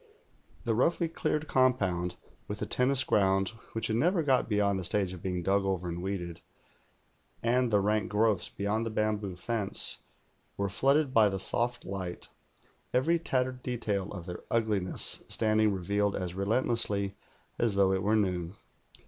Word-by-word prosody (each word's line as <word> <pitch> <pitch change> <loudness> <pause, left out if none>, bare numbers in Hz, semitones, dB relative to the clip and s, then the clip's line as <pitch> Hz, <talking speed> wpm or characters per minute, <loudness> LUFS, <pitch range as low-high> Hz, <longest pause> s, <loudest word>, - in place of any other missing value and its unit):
The 115 - 0
roughly 165 +8 +1
cleared 155 -1 -2
compound, 95 -10 +1 0.3
with 105 - -5
the 105 - -3
tennis 125 +5 +2
ground 95 -1 +2 0.2
which 115 - -3
had 110 - 0
never 170 +6 +2
got 130 -4 +1
beyond 100 -2 +1
the - - -5
stage 95 +1 +1
of 90 - -10
being 90 -2 -3
dug 100 +2 +2
over 95 -2 -2
and 85 0 -4
weeded, 90 -3 -5 1.0
and 125 +1 +2
the 105 -2 +3
rank 105 +2 0
growi:hs 105 -3 +1
beyond 105 +3 -1
the 115 - -3
bamboo 105 -3 -2
fence, 105 +1 0 0.6
were 100 0 -1
flooded 135 +6 +2
by 110 -4 +5
the 95 - -3
soft 120 +5 0
light, 95 -2 -6 0.7
every 165 +7 +2
tattered 130 -4 -1
detail 105 -6 -3
of 90 -4 -7
their 90 -1 -7
ugliness 105 -5 +3
standing 110 -1 +3
revealed 100 +2 -1
as 90 -2 -4
relentlessly 100 -1 +1 0.5
as 115 -4 +1
though 100 -1 +3
it 95 - 0
were 105 +3 +1
noon. 90 -3 -1
105 Hz, 155 wpm, -29 LUFS, 95-120 Hz, 1.0 s, by